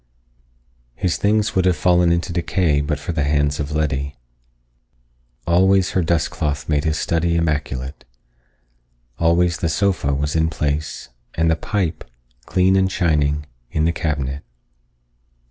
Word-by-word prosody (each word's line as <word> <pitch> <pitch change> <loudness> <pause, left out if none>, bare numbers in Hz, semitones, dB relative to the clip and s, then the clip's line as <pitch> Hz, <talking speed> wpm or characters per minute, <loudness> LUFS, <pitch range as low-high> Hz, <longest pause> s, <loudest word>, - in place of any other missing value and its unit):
His 90 -2 -1
things 105 +1 +1
would 95 -2 +2
have 90 -1 +3
fallen 90 -1 +3
into 85 0 -1
decay 85 -3 +1
but 75 +1 -1
for 75 - -5
the 80 -3 -1
hands 75 0 +1
of 75 0 -3
Letty. 70 -2 -1 1.3
Always 95 +3 +3
her 95 - +1
dust 85 0 0
cloth 75 -1 -3
made 75 -1 0
his 80 0 0
study 85 +1 0
immaculate. 75 -4 -2 1.2
Always 85 +1 +2
the 85 - -1
sofa 90 -4 +1
was 75 +2 -2
in 80 0 +2
place 75 -1 -3 0.3
and 80 0 +2
the - - +3
pipe, 85 -1 -2 0.4
clean 95 +1 +3
and 95 0 +2
shining, 75 -4 +1 0.2
in 80 +4 0
the 85 - +3
cabinet. 75 -4 -2
80 Hz, 140 wpm, -20 LUFS, 75-90 Hz, 1.3 s, have